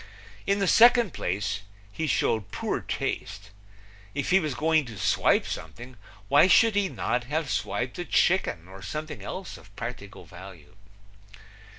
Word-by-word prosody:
In 200 Hz, 0 st, +2 dB
the 195 Hz, -1 st, 0 dB
second 235 Hz, -3 st, +6 dB
place, 100 Hz, +3 st, -2 dB, 0.3 s
he 160 Hz, +9 st, -3 dB
showed 110 Hz, -6 st, 0 dB
poor -, -, -2 dB
taste. 100 Hz, 0 st, -4 dB, 0.6 s
If 140 Hz, -, -2 dB
he 190 Hz, -, +6 dB
was 155 Hz, -7 st, -3 dB
going 155 Hz, +2 st, +2 dB
to 115 Hz, -4 st, -9 dB
swipe 95 Hz, -, +2 dB
something, 125 Hz, +2 st, -7 dB, 0.3 s
why 145 Hz, -, +6 dB
should 225 Hz, +4 st, +5 dB
he 200 Hz, -1 st, +1 dB
not 125 Hz, -6 st, -2 dB
have 150 Hz, 0 st, -2 dB
swiped 125 Hz, +5 st, -2 dB
a 175 Hz, -, -3 dB
chicken 175 Hz, -, +1 dB
or 95 Hz, +1 st, -12 dB
something 150 Hz, -, -6 dB
else 185 Hz, -1 st, -7 dB
of 100 Hz, -, -18 dB
practical 115 Hz, -4 st, -7 dB
value? 90 Hz, -2 st, -13 dB
125 Hz, 150 wpm, -26 LUFS, -, 0.6 s, second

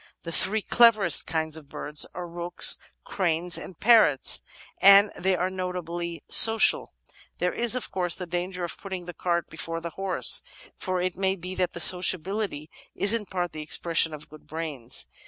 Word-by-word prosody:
The 170 Hz, -, -7 dB
three 210 Hz, +5 st, -1 dB
cleverest 215 Hz, -9 st, +3 dB
kinds 160 Hz, -1 st, -3 dB
of 150 Hz, -3 st, -14 dB
birds 150 Hz, +1 st, -2 dB
are 180 Hz, 0 st, -7 dB
rooks, 175 Hz, +1 st, +2 dB, 0.3 s
cranes, 175 Hz, -2 st, -1 dB
and 180 Hz, -, -6 dB
parrots, 220 Hz, -, +4 dB, 0.4 s
and 200 Hz, +1 st, +6 dB
they 185 Hz, +1 st, -1 dB
are 180 Hz, +1 st, -2 dB
notably 175 Hz, -3 st, -6 dB
social. 225 Hz, 0 st, +4 dB, 0.4 s
There 180 Hz, 0 st, -2 dB
is, 240 Hz, +1 st, +1 dB
of 245 Hz, -4 st, -4 dB
course^ 180 Hz, -2 st, -1 dB
the 180 Hz, -, -6 dB
danger 180 Hz, +1 st, -5 dB
of 170 Hz, -, -7 dB
putting 190 Hz, -3 st, -8 dB
the 175 Hz, -, -9 dB
cart 170 Hz, -1 st, -3 dB
before 165 Hz, +1 st, -6 dB
the 170 Hz, 0 st, -8 dB
horse, 195 Hz, +1 st, +2 dB, 0.3 s
for 185 Hz, -2 st, -4 dB
it 185 Hz, 0 st, -3 dB
may 190 Hz, 0 st, -1 dB
be 180 Hz, 0 st, -8 dB
that 180 Hz, -1 st, -3 dB
the -, -, -8 dB
sociability 185 Hz, -2 st, +3 dB, 0.3 s
is 200 Hz, +2 st, +2 dB
in 220 Hz, -3 st, -3 dB
part 175 Hz, -2 st, -4 dB
the 155 Hz, -, -8 dB
expression 160 Hz, +1 st, 0 dB
of 150 Hz, -1 st, -11 dB
good 155 Hz, 0 st, -17 dB
brains. 150 Hz, -7 st, -2 dB
180 Hz, 175 wpm, -25 LUFS, 165-190 Hz, 0.4 s, and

